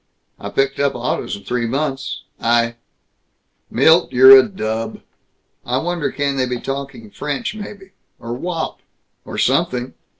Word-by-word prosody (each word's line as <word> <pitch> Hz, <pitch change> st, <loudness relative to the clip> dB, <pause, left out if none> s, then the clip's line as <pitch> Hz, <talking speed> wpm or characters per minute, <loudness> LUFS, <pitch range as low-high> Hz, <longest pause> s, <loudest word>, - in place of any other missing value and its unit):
I -, -, -6 dB
picked 135 Hz, 0 st, 0 dB
up 140 Hz, -1 st, +1 dB
autos -, -, -2 dB
in 100 Hz, -, -12 dB
three 120 Hz, -1 st, -1 dB
months. 135 Hz, +2 st, -3 dB, 0.2 s
I 115 Hz, 0 st, +1 dB, 0.9 s
Milt, 165 Hz, +2 st, +4 dB
you're 130 Hz, +1 st, +8 dB
a 135 Hz, -, +9 dB
dub. 110 Hz, -, -4 dB, 0.6 s
I 125 Hz, +1 st, -1 dB
wonder 170 Hz, +1 st, -1 dB
can 140 Hz, -1 st, -1 dB
they 130 Hz, -1 st, +1 dB
be 125 Hz, -1 st, -3 dB
talking 135 Hz, -6 st, -6 dB
French, 150 Hz, +11 st, -3 dB
maybe, 200 Hz, -2 st, -9 dB, 0.3 s
or 115 Hz, 0 st, -5 dB
Wop, 165 Hz, +5 st, -4 dB, 0.5 s
or -, -, -7 dB
something? 125 Hz, 0 st, +1 dB
135 Hz, 140 wpm, -19 LUFS, 120-155 Hz, 0.9 s, a